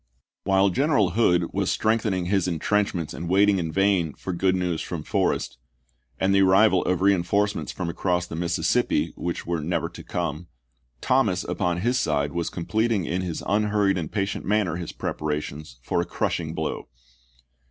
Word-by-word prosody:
While 95 0 +3
General 130 - +2
Hood 90 -6 +2
was - - 0
strengthening 110 -5 0
his 95 0 +1
in 85 -2 -1
trenchments 95 -2 0
and 85 +1 -5
waiting 100 +1 +4
in 80 -2 -2
vain 95 -4 +1
for 95 - -5
good 95 +2 +1
news 90 -3 -1
from - - -5
Forrest, - - -1 0.6
and 95 +1 +2
the 100 - +5
arrival 95 0 +5
of 90 -1 0
reinforcements 100 +2 +1
from 90 - -4
across 90 +1 -1
the 85 - -7
Mississippi, 85 +1 0
which 85 -1 -4
were 85 -2 -2
never 85 +4 -1
to - - -11
come, 75 +4 -3 0.5
Thomas - - +2
upon 85 -1 -1
his 125 +4 +1
side 75 -1 0
was 85 -1 -2
completing 110 +2 0
in 90 +3 -1
his 90 -3 -4
unhurried 105 -2 +1
and 80 - -5
patient 100 -1 -2
manner 100 -5 0
his 85 -2 -5
preparations 75 -3 -4
for - - 0
a - - -3
crushing - - -2
blow. - - -3
90 Hz, 165 wpm, -25 LUFS, 85-100 Hz, 0.6 s, the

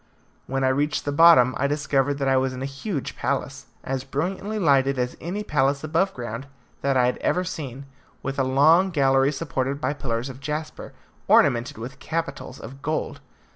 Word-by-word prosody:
When 135 0 -1
I 130 - +3
reached 145 +3 0
the 145 - -1
bottom 145 -5 +6
I 140 - +2
discovered 145 -1 0
that 140 -1 -2
I 135 - +3
was 130 0 +1
in 130 - -5
a 135 0 -6
huge 185 - -3
palace, - - -3 0.2
as 135 -1 -3
brilliantly 185 +10 -3
lighted 140 -7 +3
as 125 0 -1
any 190 +6 -4
palace 140 -5 +1
above 165 +5 +1
ground 120 +2 -6 0.3
that 135 -1 +1
I 125 - +4
had 125 - 0
ever 180 - 0
seen, 140 -7 -6 0.4
with 135 +1 -3
a - - +3
long 155 +8 +4
gallery 135 -4 +3
supported 140 -2 -2
by 145 - -1
pillars 115 -3 -3
of 130 -1 -9
jasper, 150 +2 -5 0.3
ornamented 120 -1 +3
with 125 +5 -8
capitals 165 -5 -4
of 135 +2 -10
gold. 155 +2 -3
140 Hz, 180 wpm, -24 LUFS, 130-155 Hz, 0.4 s, bottom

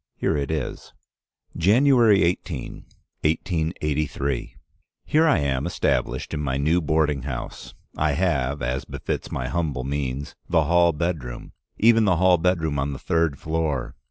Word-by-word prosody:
Here - - 0
it 70 -2 -2
is: 75 -5 -4 0.6
"January 115 - +5
18, 85 -4 -3 0.4
1883. 75 -5 -1 0.5
Here 160 +2 +3
I 155 - +4
am 70 -3 -1
established - - -1
in 75 - -2
my 65 -3 -1
new 80 +5 +2
boarding 75 -2 +1
house. 65 -1 -6 0.2
I 80 -1 +1
have, 70 -5 0
as 65 +1 -1
befits - - -5
my 65 -1 -3
humble 75 -5 -2
means, 70 0 -3 0.2
the 85 -2 +3
hall 85 +2 +4
bedroom, 75 -7 -4 0.3
even 115 0 +5
the 90 -3 +3
hall 90 0 +4
bedroom 80 -4 0
on 70 +1 -1
the - - -6
third 80 -3 0
floor. 80 -4 -2
80 Hz, 140 wpm, -24 LUFS, 70-85 Hz, 0.6 s, January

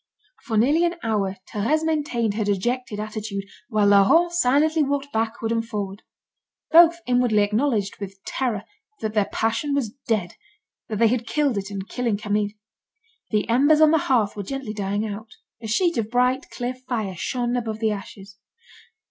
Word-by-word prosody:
For 225 -5 -1
nearly 290 +10 +4
an 345 0 +1
hour 200 -4 -1 0.2
Thérèse 290 +10 +1
maintained 285 -9 0
her 215 +1 -1
dejected 210 +3 -1
attitude, 215 -2 -4 0.3
while 215 -3 +2
Laurent 205 - +5
silently 310 0 +3
walked 285 0 -1
backward 225 0 -1
and 230 0 +1
forward. 205 -3 -5 0.7
Both 340 +1 +7
inwardly 245 -4 +3
acknowledged, 210 -1 0
with 195 -1 -7
terror, 235 -7 -2 0.4
that 215 -1 -2
their 210 -2 +1
passion 230 +6 0
was 250 -7 -1 0.2
dead, 200 -6 0 0.6
that 215 - -2
they 230 +1 +4
had 240 0 -1
killed 290 -5 +1
it 195 0 -3
in 200 -1 -5
killing 230 +1 -2
Camille. 210 0 0 0.8
The 210 -2 0
embers 285 +6 +4
on 310 -1 +6
the 320 - +4
hearth 230 -8 +1
were 205 - -4
gently 260 +1 -5
dying 205 +1 -2
out; 215 +1 -6 0.3
a 225 - -6
sheet 335 - +1
of 220 -1 -2
bright, 250 +3 +1
clear 245 0 -3
fire 245 -6 -4
shone 245 +6 -2
above 225 -3 -2
the 220 -1 0
ashes. 200 0 -8
225 Hz, 165 wpm, -23 LUFS, 205-265 Hz, 0.8 s, Both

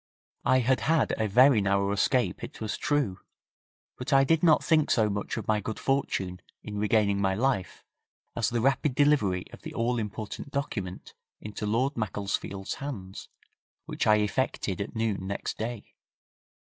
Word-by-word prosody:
I 130 0 +4
had 130 +2 +2
had 160 0 +2
a 110 - +1
very 125 +2 +6
narrow 100 0 +1
escape 125 +5 +1
it - - -8
was 110 -2 -3
true, 140 -11 0 0.8
but 125 +4 -4
I 135 -1 +6
did 160 +3 +2
not 160 -3 +5
think 155 -2 +3
so 110 -3 +3
much 100 +3 -3
of 110 - -5
my 110 -1 +2
good 110 +2 -5
fortune 95 -9 -1 0.2
in 105 -1 -5
regaining 105 -2 +2
my 95 -1 +1
life 110 -6 -1 0.5
as 115 - +1
the 120 -1 -1
rapid 135 +1 +1
delivery 130 -12 +2
of - - -11
the - - -8
all 120 +1 0
important 105 +4 -5
document 105 -10 -4 0.3
into 105 0 -5
Lord 125 +6 0
Macclesfield's 100 -2 -3
hands, 100 -9 -7 0.6
which - - -2
I 110 - +7
effected 105 -2 -1
at 100 - -6
noon 110 -4 -1
next 100 - -4
day. 115 0 -5
110 Hz, 160 wpm, -28 LUFS, 100-130 Hz, 0.8 s, I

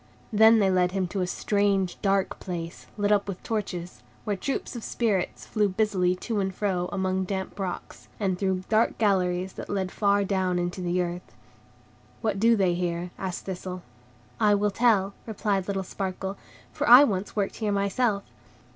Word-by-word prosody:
Then 220 +2 +7
they 195 -3 +3
led 180 -1 +2
him 190 -2 0
to 195 +1 -2
a 180 - 0
strange, 200 -1 +1
dark 195 -1 +1
place, 170 -3 -6
lit 205 0 +1
up 205 -1 +3
with 195 -2 -6
torches; 185 -5 -4 0.2
where 210 -2 -1
troops 265 +5 -3
of 235 - -6
Spirits 210 -6 -1
flew 210 -2 +1
busily 185 -3 +1
to 215 +3 -3
and 190 -1 0
fro, 185 -2 -1
among 190 0 0
damp 190 +1 -4
rocks, 185 -2 -5
and 195 -3 +1
through 190 0 -1
dark 225 +1 +2
galleries 185 -3 +1
that - - -8
led 190 -2 -1
far 200 -1 +2
down 185 -2 0
into 175 +1 -2
the 180 0 +1
earth. 175 +1 -7 0.9
"What 215 -4 -1
do 230 +2 +5
they 190 -4 +2
here?" 175 0 -2
asked 185 -2 -4
Thistle. 185 -1 -5 0.6
"I 210 -2 +4
will 205 0 +1
tell," 200 -3 +3
replied 200 -3 -1
little 195 -1 -1
Sparkle, 190 0 -4 0.4
"for - - -1
I 250 +4 +11
once 200 -6 -1
worked 200 -2 -1
here 215 -2 -1
myself. 200 +1 +1
195 Hz, 175 wpm, -26 LUFS, 185-205 Hz, 0.9 s, I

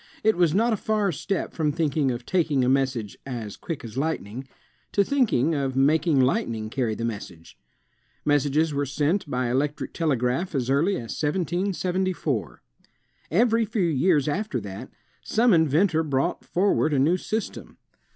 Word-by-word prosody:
It 220 0 +4
was 175 -2 +2
not 230 +3 +3
a - - 0
far 210 -1 0
step 185 +5 -3
from 155 -3 0
thinking 150 -2 0
of 120 -1 -4
taking 150 -8 +1
a - - +1
message 130 -6 0
as 115 -6 -6
"quick 155 -4 -6
as 115 +3 -5
light 160 +3 0
ning," 120 +7 -9 0.5
to 200 - +4
thinking 200 - +2
of 135 -3 -1
making 145 +2 +3
lightning 115 -4 0
carry 120 -5 -1
the 115 - -3
message. 100 -7 -7 0.7
Messages 145 +2 +2
were 140 0 -1
sent 150 +5 0
by 125 -2 -1
electric 145 +3 -1
telegraph 145 +2 0
as 130 -1 0
early 160 +9 +2
as 115 -9 -5
1774. 175 - -1 0.7
Every 230 +5 +3
few 215 -2 -1
years 155 -1 +2
after 190 - -1
that, 100 -1 -8 0.3
some 230 0 +3
inventor 160 +1 +3
brought 145 +2 -1
for 195 +3 +2
ward 155 -1 +1
a - - +2
new 150 +7 +3
system. 215 +4 -5
150 Hz, 160 wpm, -25 LUFS, 130-180 Hz, 0.7 s, It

